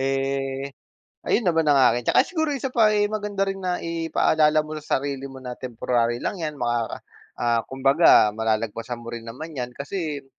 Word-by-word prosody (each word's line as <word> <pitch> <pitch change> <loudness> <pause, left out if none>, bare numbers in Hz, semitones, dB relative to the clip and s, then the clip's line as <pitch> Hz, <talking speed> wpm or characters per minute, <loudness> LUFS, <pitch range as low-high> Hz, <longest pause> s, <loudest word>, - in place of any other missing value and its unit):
eh, 135 0 -1 0.6
ayun 230 - +2
naman 165 -1 +2
ang 145 - +5 0.2
akin 120 +1 -2
'tsaka - - +5
siguro 315 -4 -1
1 265 +1 -3
pa 225 -3 +5
ay 205 0 +3
maganda 205 -2 -1
rin 195 - -2
na 180 -1 -2
ipaalala 160 -2 +2
mo 155 - -8
sa - - 0
sarili 140 -1 -4
mo 135 0 -11
na 125 - -5
temporary 120 -1 -1
lang - - -2
yan 150 -2 -3
makaka 120 -1 -1 0.4
ah, 120 -1 +2
kumbaga 135 -4 +5
malalagpasan 110 +2 -2
mo - - -8
rin 115 -1 -7
naman 155 +7 -8
yan 125 -3 -4
kasi, 150 -1 -4
135 Hz, 180 wpm, -24 LUFS, 120-165 Hz, 0.6 s, ang